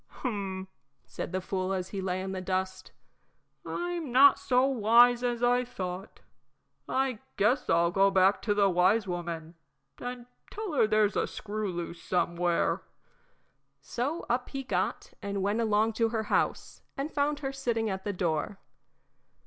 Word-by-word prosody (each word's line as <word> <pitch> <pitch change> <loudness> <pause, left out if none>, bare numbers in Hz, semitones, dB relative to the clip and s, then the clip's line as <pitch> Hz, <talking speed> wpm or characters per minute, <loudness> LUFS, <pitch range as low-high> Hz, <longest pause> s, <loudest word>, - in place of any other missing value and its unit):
"Hum," 195 -6 -4 0.4
said - - -6
the 185 0 -2
fool, 185 0 -2
as 185 -1 -3
he 195 - -4
lay 185 0 -2
in 190 - -4
the 190 -1 -4
dust, 185 0 -3 0.7
"I'm 345 -5 -4
not 275 +3 +7
so 255 0 +3
wise 240 -1 +5
as 240 -1 -1
I 245 +1 +3
thought. 190 -6 -6 0.7
I 260 -4 0 0.2
guess 245 +6 +2
I'll 170 +1 +3
go 195 +1 +4
back 195 0 +3
to 205 -2 0
the 200 -1 +4
wise 190 +4 +3
woman 170 -2 -4 0.5
and 245 -1 -6 0.2
tell 420 -5 -5
her 240 -6 +4
there's 215 -1 +2
a - - +1
screw 215 -1 -4
loose 170 -1 -6
somewhere." 175 -1 0 1.0
So 280 +8 -3
up 245 +1 -1
he 275 -1 -4
got 255 - -2
and 200 -1 -3
went 205 +4 +1
along 220 0 +2
to 225 - +4
her 220 -1 -1
house, - - 0 0.2
and 280 +3 -3
found 290 0 0
her 270 -1 -3
sitting 235 -5 -1
at 190 -2 -3
the 205 - -2
door. 175 0 -2
210 Hz, 155 wpm, -29 LUFS, 185-245 Hz, 1.0 s, not